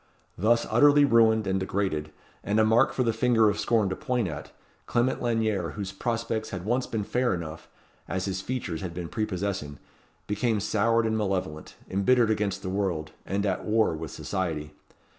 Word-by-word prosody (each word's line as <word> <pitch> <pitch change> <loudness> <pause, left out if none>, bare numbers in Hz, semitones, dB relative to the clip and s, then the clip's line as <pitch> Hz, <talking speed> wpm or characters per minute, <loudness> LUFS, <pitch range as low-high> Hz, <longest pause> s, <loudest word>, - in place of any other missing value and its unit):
Thus 115 +5 +2
utterly 145 0 +6
ruined 110 -4 +4
and 95 0 0
degraded, 95 -6 -2 0.3
and 105 +2 +1
a 110 - +5
mark 115 +4 +4
for 130 - 0
the 115 -2 +1
finger 115 -2 +3
of 100 - -5
scorn 110 -4 +2
to 95 - -2
point 125 -5 -1
at, 75 -3 -7 0.4
Clement 120 +2 +1
Lanyere, 110 -7 0
whose 100 -2 -5
prospects 115 -1 -2
had 90 -2 -6
once 125 +4 0
been 110 -2 -2
fair 125 0 0
enough, 85 -1 -7 0.4
as 95 -1 -2
his 95 -1 -2
features 95 -8 -4
had 90 -3 -5
been 85 -2 -5
prepossessing, 100 -8 -3 0.5
became 105 +1 0
soured 115 +3 +2
and 110 0 0
malevolent, 95 -7 -3
embittered 110 +4 +3
against 105 -3 -1
the - - -4
world, 95 -5 -2 0.2
and 100 +2 -1
at 100 - -1
war 110 -4 +2
with 80 0 -5
society. 80 -6 -3
105 Hz, 175 wpm, -27 LUFS, 95-115 Hz, 0.5 s, utterly